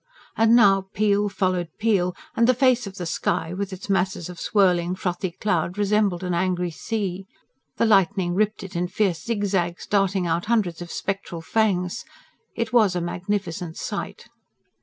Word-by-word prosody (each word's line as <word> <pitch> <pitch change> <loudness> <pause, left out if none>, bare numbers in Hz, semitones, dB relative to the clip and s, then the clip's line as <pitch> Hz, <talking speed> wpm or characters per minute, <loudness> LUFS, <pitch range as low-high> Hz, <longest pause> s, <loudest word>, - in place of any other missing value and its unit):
And 225 +1 +5
now 195 -4 +5
peal 205 0 +2
followed 185 -3 0
peal, 200 -5 +1 0.2
and 230 0 +3
the 255 - +4
face 250 -3 +3
of 195 - -9
the 180 - -5
sky, 165 0 -1
with 200 +1 -3
its 190 +1 -8
masses 190 -3 0
of 175 -2 -9
swirling, 180 -3 +2
frothy 180 0 -2
cloud, 180 0 -1
resembled 205 -3 +1
an 180 -1 -1
angry 180 0 0
sea. 195 +1 -4 0.5
The - - +3
lightning 195 -4 +3
ripped 210 +2 0
it 195 -1 -9
in 175 +1 0
fierce 190 -3 0
zigzags, 195 -6 -1
darting 195 -2 +1
out 170 +1 0
hundreds 210 -7 0
of 175 - -7
spectral 195 -4 -4
fangs. 180 -1 0 0.5
It 230 0 -3
was 215 -6 +4
a - - +1
magnificent 175 -1 -3
sight. - - -5
190 Hz, 160 wpm, -24 LUFS, 175-210 Hz, 0.5 s, And